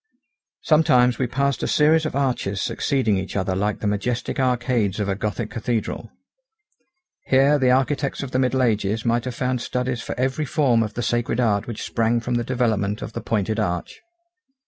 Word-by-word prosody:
Sometimes 125 -6 +4
we 130 - +1
passed 140 +2 0
a - - -1
series 155 +1 +3
of - - -6
arches 125 -8 -1
succeeding 120 -7 0
each 95 - -6
other 95 -1 -1
like 105 +1 -1
the - - -3
majestic 110 +6 -2
arcades 120 -5 0
of 105 - -1
a 100 - +1
gothic 105 +2 -3
cathedral. 115 -1 -3 1.2
Here 140 +2 +4
the 130 -2 +3
architects 135 +2 +1
of 135 - -6
the 130 - 0
middle 130 0 +2
ages 110 -1 0
might 115 +1 +1
have 125 - -4
found 125 -1 -1
studies 125 -1 -2
for - - -6
every 130 +4 0
form 130 -6 +2
of 110 -2 -3
the 120 - -2
sacred 120 +1 0
art 105 -5 +1
which 115 -3 -5
sprang 115 0 +1
from 120 +1 -3
the 120 0 +1
development 110 -5 -1
of 115 - -7
the - - -4
pointed 110 0 -1
arch. 90 -5 -3
120 Hz, 185 wpm, -22 LUFS, 105-130 Hz, 1.2 s, Sometimes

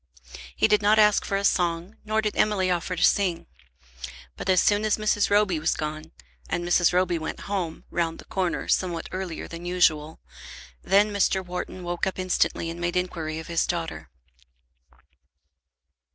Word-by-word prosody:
He - - +3
did 210 -1 +3
not 210 +1 +4
ask 210 -1 +5
for 195 - -1
a 200 - -1
song, 175 +2 0
nor 220 0 0
did 210 - -1
Emily 195 -3 +2
offer 180 +1 -1
to 175 - -1
sing. 185 -4 +2 0.9
But - - -6
as 185 -1 +5
soon 205 0 +3
as 215 -1 +1
Mrs. 215 -1 +1
Roby 205 -5 +2
was 155 - 0
gone, 155 +1 -5 0.4
and 175 - -2
Mrs. 175 0 +3
Roby 180 -1 +1
went 160 - -5
home, 185 -5 -4
round 165 -1 -1
the - - -13
corner, 185 -3 -2
somewhat 175 -3 0
earlier 185 -3 -5
than 170 +1 -9
usual, 160 -3 +1 0.6
then 205 +2 +3
Mr. 190 -1 +1
Wharton 180 +1 -6
woke 175 +1 -2
up 190 - -3
instantly 185 -2 0
and 170 +1 -8
made 175 +1 -1
inquiry 165 -3 -3
of 160 - -6
his 170 -1 0
daughter. 170 -2 -4
180 Hz, 165 wpm, -25 LUFS, 170-200 Hz, 0.9 s, ask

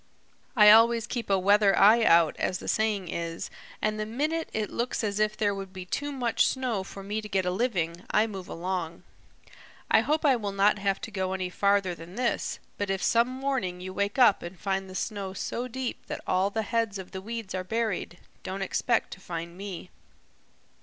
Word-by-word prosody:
I 210 -3 +9
always 230 +1 +6
keep 240 -2 -4
a 195 - +4
weather 200 +1 +4
eye 225 +3 +6
out, 165 -5 +5
as 185 - -1
the - - -9
saying 215 -4 0
is, 165 0 -4 0.3
and 215 0 0
the 215 - -1
minute 305 +8 -1
it 215 -1 -2
looks 240 0 -2
as 205 -1 -1
if 215 0 +1
there 205 -2 +1
would 195 -1 -6
be 185 -1 -8
too 290 +10 -3
much 245 -4 +1
snow 250 -7 -1
for 195 +1 -9
me 210 +2 -3
to 210 - -9
get 190 -2 0
a 180 - +1
living, 180 -5 -1
I 210 - +3
move 195 -5 -7
along. 170 -1 -4 0.9
I - - +7
hope 305 +1 0
I 275 -3 +6
will 205 -3 -4
not 200 +1 +3
have 195 -1 0
to 225 - -6
go 190 -2 -2
any 185 -1 -3
farther 200 -1 +2
than 170 +2 -11
this, 245 0 -1 0.2
but 205 -1 -1
if 195 0 -1
some 235 +1 +3
morning 260 -9 -2
you 185 +1 -6
wake 200 +3 -1
up 245 -6 +6
and 175 +1 -8
find 195 -1 -2
the 185 - -9
snow 195 -2 -3
so 240 +5 -3
deep 255 0 -5
that - - -5
all 185 +2 +2
the 220 +2 -2
heads 225 -2 -1
of 190 -1 -9
the 190 - -6
weeds 225 -1 -6
are 185 0 -2
buried, 220 -4 -2 0.2
don't 195 +1 -4
expect 195 - 0
to - - -8
find 170 -1 -6
me." 190 -2 -7
200 Hz, 205 wpm, -28 LUFS, 185-230 Hz, 0.9 s, I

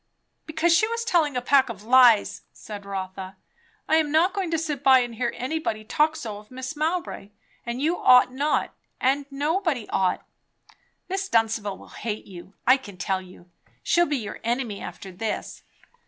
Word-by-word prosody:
"Because 320 +2 +2
she 435 - +3
was 465 0 -3
telling 310 - +2
a 250 - -2
pack 270 0 +4
of 210 -3 -8
lies!" 240 -2 +5
said 205 -2 -9
Rotha. 190 -1 -6 0.5
"I'm 315 -2 +2
not 335 +5 +3
going 390 -4 -2
to 325 - 0
sit 300 -4 -3
by 265 -1 +7
and 240 -2 -1
hear 235 +1 -1
anybody 255 -5 -3
talk 300 +8 +1
so 215 -8 -6
of 210 - -18
Mrs. 260 +3 -6
Mowbray. 320 - -2 0.4
And 235 +1 -3
you 325 +5 0
ought 250 0 +6
not; 290 +3 0 0.3
and 275 +2 +1
nobody 295 - -1
ought." 185 -1 0 0.8
"Miss 390 +1 -3
Dunstable 225 -3 +1
will - - -15
hate 215 -2 -5
you, 185 +1 -12
I 255 +2 +6
can 205 -8 -12
tell 190 +1 -1
you. 180 -1 -16 0.3
She'll 345 0 +3
be 290 - 0
your 215 -5 -6
enemy 235 -3 -2
after 190 - -8
this." 210 +4 -4
255 Hz, 170 wpm, -25 LUFS, 210-315 Hz, 0.8 s, by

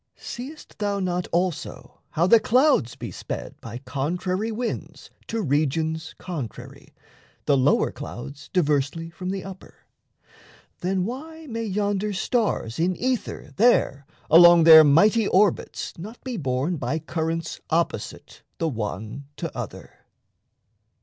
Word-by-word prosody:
Seest 275 +6 -9
thou 205 -1 -1
not 180 -1 -1
also 175 -1 -2
how 165 - +1
the 225 +5 +7
clouds 250 - +3
be - - -7
sped - - -6
By 115 +1 -7
contrary 175 - -2
winds 230 +2 -5 0.2
to 225 -1 -2
regions 155 +2 -1
contrary, 150 - -8 0.5
The 140 - +4
lower 135 +2 +3
clouds 140 +1 -9
diversely 155 0 0
from 180 +2 -6
the 195 0 -3
upper? 190 -1 -12 0.9
Then, 185 0 0
why 315 +8 -7
may 230 -4 -4
yonder 205 0 -1
stars 195 - -1
in 180 +2 +1
ether 255 -1 -3
there 145 - +3 0.2
Along 170 +1 +8
their 160 -1 +10
mighty 200 +9 +4
orbits 195 0 +1
not 215 +7 -8
be 255 -2 -4
borne 140 - -1
By 140 +3 -2
currents 165 +1 -3
opposite 165 -9 -2 0.2
the 165 - 0
one 110 +2 -5
to - - -5
other? - - -8
175 Hz, 125 wpm, -24 LUFS, 145-210 Hz, 0.9 s, their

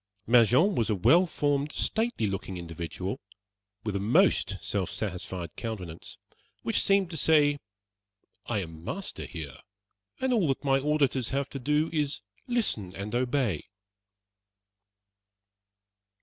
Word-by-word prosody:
Mangin 125 - +5
was 115 -9 0
a 105 - +2
well 170 - +5
formed, 145 -2 0
stately 225 - 0
looking 95 -2 -3
individual, 85 +2 -5 0.6
with 105 -2 -2
a - - +1
most 115 - +3
self 100 -2 -2
satisfied 90 -4 -5
countenance, 95 -8 -6 0.5
which 225 - +2
seemed 195 -3 +3
to 160 - -4
say: 145 -1 +4 0.9
"I 110 -4 0
am 80 -1 -10
master 190 - -5
here; 75 -7 -7 0.6
and 260 -1 +1
all 205 -9 +3
that 135 0 -1
my 135 -1 +3
auditors 140 -4 +1
have 140 0 -2
to 135 - -5
do 150 +4 +1
is, 150 -2 0 0.2
to - - -31
listen 155 - -1
and 100 +3 -5
obey." 120 - 0
125 Hz, 130 wpm, -28 LUFS, 95-150 Hz, 0.9 s, Mangin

